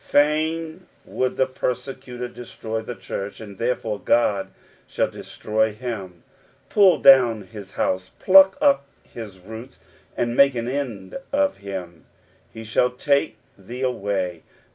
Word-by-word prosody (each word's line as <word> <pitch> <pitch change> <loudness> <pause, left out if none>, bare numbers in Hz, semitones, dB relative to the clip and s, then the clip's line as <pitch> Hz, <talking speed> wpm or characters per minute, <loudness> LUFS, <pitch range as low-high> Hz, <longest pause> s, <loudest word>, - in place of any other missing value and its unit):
Fain 160 +4 +1 0.2
would 130 0 -2
the 130 - +4
persecutor 125 -1 -4
destroy 115 -2 -6
the 120 +2 -7
church, 100 -2 -6
and 100 -3 -10
therefore 115 -3 -1
Ood 105 -4 +3 0.4
shall - - -1
destroy 110 0 -1
him, 105 -7 -6 0.5
pull 195 -3 +5
down 125 -6 +6
his 100 -1 -11
house, 95 0 -1
pluck 190 +4 +6
up 280 - +3 0.2
his 105 -5 -10
roots, 110 +7 -10 0.4
and 120 0 0
make 140 -1 +5
an 115 0 -2
end 125 - -4
of 285 0 +1
him. 90 -4 -7 0.2
" - - -35
ffe 110 0 -8
thou 125 - +4
take 140 0 0 0.2
thee 120 +7 -7
away." 95 -8 -2
120 Hz, 135 wpm, -23 LUFS, 105-135 Hz, 0.5 s, down